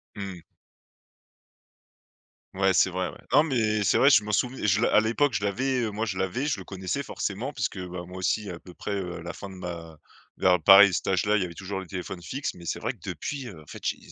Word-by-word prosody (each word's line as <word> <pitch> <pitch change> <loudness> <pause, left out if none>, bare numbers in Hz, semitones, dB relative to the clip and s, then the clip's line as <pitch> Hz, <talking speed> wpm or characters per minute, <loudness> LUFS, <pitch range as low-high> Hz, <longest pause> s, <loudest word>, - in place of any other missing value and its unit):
Mmh. 95 -4 -6 2.1
Ouais, 95 0 +2
c'est 95 - +4
vrai, 95 0 -2
ouais. - - -11
Non, 150 - +6
mais 110 -8 +1
c'est - - +3
vrai, 140 - +6
je 105 -6 +6
m'en 105 - -3
souv 125 +5 +1
je 100 -2 +2
à - - +5
l'époque, 120 +5 +1
je 100 - -1
l'avais, 130 +6 0
heu, 110 - -1
moi, 110 +2 -2
je 95 -3 -3
l'avais, 120 +10 -1
je 135 - 0
le 95 - -9
connaissais 95 +8 -3
forcément 125 +2 -4
puisque, 100 - -3
bah, 90 -1 -6
moi 90 +1 -10
aussi 100 +2 -1
à 85 - -7
peu 90 - -14
près, 105 - -6
heu, 90 -3 -4
à - - -9
la 85 +1 -5
fin 100 +4 -9
de 95 - -10
ma 85 -3 -7 0.4
vers 90 -2 +3
pareil 95 +3 +9
à - - -5
cet 85 - -2
âge-là, 105 +3 +2
il - - 0
y - - 0
avait 85 - -8
toujours 95 +1 -5
les 95 - -8
téléphones 90 -1 -6
fixes. 135 +11 -4
Mais 85 -1 -12
c'est - - -2
vrai 115 +3 -1
que 115 - -18
depuis, 130 - -4
heu, 85 -7 -10
en - - -17
fait, - - -9
j'ai - - 0
95 Hz, 250 wpm, -27 LUFS, 90-110 Hz, 2.1 s, pareil